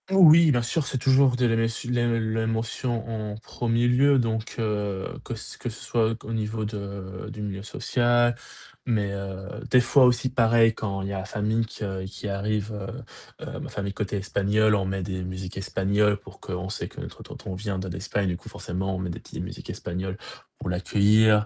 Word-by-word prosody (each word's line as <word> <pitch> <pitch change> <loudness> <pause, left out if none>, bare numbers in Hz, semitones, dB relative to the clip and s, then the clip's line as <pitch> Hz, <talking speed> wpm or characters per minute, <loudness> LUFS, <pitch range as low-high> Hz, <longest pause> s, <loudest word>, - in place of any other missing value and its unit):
Oui, 170 -4 +8
bien 120 -3 +3
sûr, 145 +5 0
c'est 135 - 0
toujours 130 0 +4
de 125 - +2
l'éme 115 -1 +3 0.2
l'ém 115 -2 +1
l'émotion 115 +1 -1 0.3
en - - -6
1er 115 +1 0
lieu 135 +3 +5
donc 110 -2 -1
heu, 105 -3 -1 0.2
que - - -4
ce - - -5
que 120 - -4
ce 115 - -8
soit 115 0 0
au 115 - -4
niveau 110 0 -2
de 100 -3 -6
du 110 - -7
milieu 100 -2 -4
social 120 +1 +2 0.5
mais 105 -4 +1
heu, 95 -1 -5 0.2
des 125 - +6
fois 130 +2 +6
aussi, 125 +1 +3
pareil, 115 -2 +4
quand 100 -3 -3
il 100 - -3
y - - -3
a 95 - -2
la 95 - -4
famille 105 +3 0
que 100 -4 -4
qui 100 +2 -6
arrive, 105 +2 -1
heu 100 -2 -9
heu, - - -6
ma - - -6
famille 100 0 -3
côté 105 -1 -2
espagnole, 100 +2 +2
on 100 -2 0
met 95 0 -2
des 95 0 -3
musiques 95 0 -6
espagnoles 100 +2 +2
pour 100 -1 -15
que - - -7
on 90 +1 -3
sait 105 - -2
que - - -11
notre - - -8
tonton 95 - -7
vient 100 +1 -3
de 95 - -4
l'Espagne 95 +2 -2
du 90 -1 -1
coup - - -11
forcément, 95 +2 -3
on - - -3
met 90 -1 -3
des - - -6
petites - - -8
musiques - - -8
espagnoles 95 +2 -4 0.4
pour - - -6
l'accueillir. 105 +4 +4
105 Hz, 200 wpm, -26 LUFS, 95-115 Hz, 0.5 s, Oui